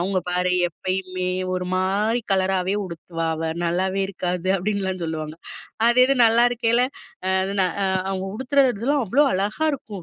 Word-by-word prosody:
"அவங்க 190 +2 0
பாரு 180 0 +1 0.2
எப்பயுமே 185 +1 -3 0.3
ஒரு 180 0 -2
மாதிரி 205 +5 +1
கலராகவே 190 0 +1
உடுத்துவா 165 -1 -5
அவ, 160 0 -2
நல்லாவே 185 +3 0
இருக்காது." 180 -1 -3
அப்படின்லாம் 190 -2 -2
சொல்லுவாங்க. 155 -1 -4 0.5
அது 240 +1 +3
இது 275 - +2
நல்லா 230 +1 +5
இருக்கல 235 0 +2 0.5
அ - - +2 0.3
ன - - +5 0.5
"அவங்க 190 -1 -2
உடுத்துறதுலாம் 265 +1 +1
அவ்வளோ 265 +9 +3
அழகா 205 +10 -1
இருக்கும். 210 -8 -7
190 Hz, 140 wpm, -23 LUFS, 180-225 Hz, 0.5 s, நல்லா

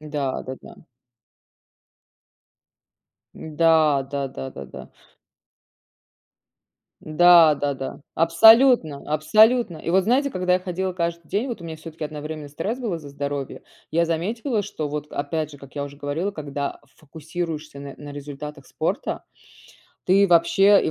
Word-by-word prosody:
да-да-да. 140 -3 -5 2.6
Да 155 -3 +2
да 140 -1 -2
да 135 0 -7
да 70 - -9
да. - - -10 2.2
Да-да-да, 155 -5 +4
абсолютно, 170 - +5
абсолютно. 215 +6 +4
И 165 - -4
вот 190 +1 +3
знаете, 270 +5 +2
когда 180 -2 +1
я - - +2
ходила 185 0 -3
каждый 170 -2 -3
день, 225 +7 -1
вот 225 -6 -5
у - - -10
меня 160 -1 -6
всё-таки 155 0 -8
одновременно 150 0 -6
стресс 200 - -4
был 230 -8 -3
из-за 155 -4 -7
здоровья. 140 -1 -5 0.3
Я 170 +1 +2
заметила, 210 - -1
что 155 -5 -5
вот 150 0 -5
опять 155 +1 -3
же, 145 - -13
как 140 +1 -14
я 145 - -3
уже 140 0 -10
говорила, 150 +7 -3
когда 145 -4 -5 0.2
фокусируешься 155 -1 -6
на 140 -1 -8
на 145 -1 -10
результатах 145 0 -8
спорта, - - -3 0.8
ты 195 +2 +4
вообще 195 +4 +5
и - - 0
160 Hz, 130 wpm, -23 LUFS, 145-180 Hz, 2.6 s, абсолютно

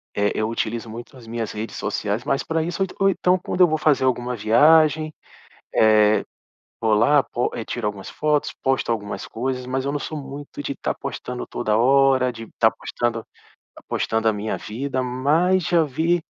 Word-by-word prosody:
eh, 105 0 +1
eu 110 - 0
utilizo 115 0 -3
muito 120 +4 -9
as 120 - -13
minhas 115 -1 -4
redes 110 +1 -6
sociais 105 +3 -2
mais 135 - 0
para 160 0 -1
isso, 175 +4 -1
ou - - +1
en - - -14
ou - - +6
então 180 -1 +2
quando 180 +1 -2
eu 180 - +8
vou 155 0 0
fazer 150 -3 +3
alguma 125 -1 0
viagem, 155 +8 +4 0.6
eh, 110 -1 +4 0.6
vou 110 -2 +3
lá, 140 +7 +4
pos 120 - -2 0.2
tiro 120 -3 -3
algumas 100 -2 -4
fotos, 150 -1 0
posto 130 -3 +1
algumas 105 -3 -3
coisas, 125 +2 -3
mas 130 +1 -2
eu 140 - -1
não 145 - -1
sou 155 - -5
muito 140 +1 -8
de - - -3
estar - - -3
postando - - -6
toda 105 0 -1
hora, 130 +1 +4
de 115 - -8
estar 110 0 +2
postando 120 -1 -3 0.5
tá - - -14
postando 110 0 0
a 110 - +3
minha 105 +1 -3
vida, 130 +4 -3
mas 150 +9 +2
já 170 -2 +3
vi, 165 +5 0
130 Hz, 190 wpm, -22 LUFS, 110-150 Hz, 0.6 s, eu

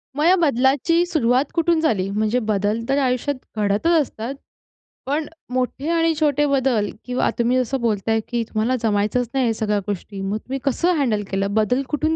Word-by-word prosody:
मग 300 +2 +1
या 365 +2 +6
बदलाची 285 +4 +2
सुरुवात 270 -6 +2
कुठून 335 -1 +2
झाली? 195 -11 +1
म्हणजे 215 +4 0
बदल 210 +2 0
तर 275 - +2
आयुष्यात 260 +2 0 0.2
घडतच 205 +6 0 0.2
असतात. 255 -1 -5 0.7
पण 295 +3 -1 0.3
मोठे 255 +4 -2
आणि 330 -1 +2
छोटे 295 -1 +2
बदल 260 -7 +1 0.2
किंवा 250 0 0
तुम्ही 240 +2 +2
जसं 255 +1 -1
बोलताय, 225 0 +1
की 240 -1 -1
तुम्हाला 225 +3 -1
जमायचंच 215 +3 +1
नाही 265 -2 +1
ह्या 225 - +1
सगळ्या 210 -1 0
गोष्टी, 200 0 -5
मग 195 +2 -2
तुम्ही 265 +4 -5
कसं 340 +6 +1
हँडल 220 -7 +1
केलं? 195 +1 -1
बदल 220 +5 +2
कुठून 315 +2 0
250 Hz, 175 wpm, -21 LUFS, 215-285 Hz, 0.7 s, या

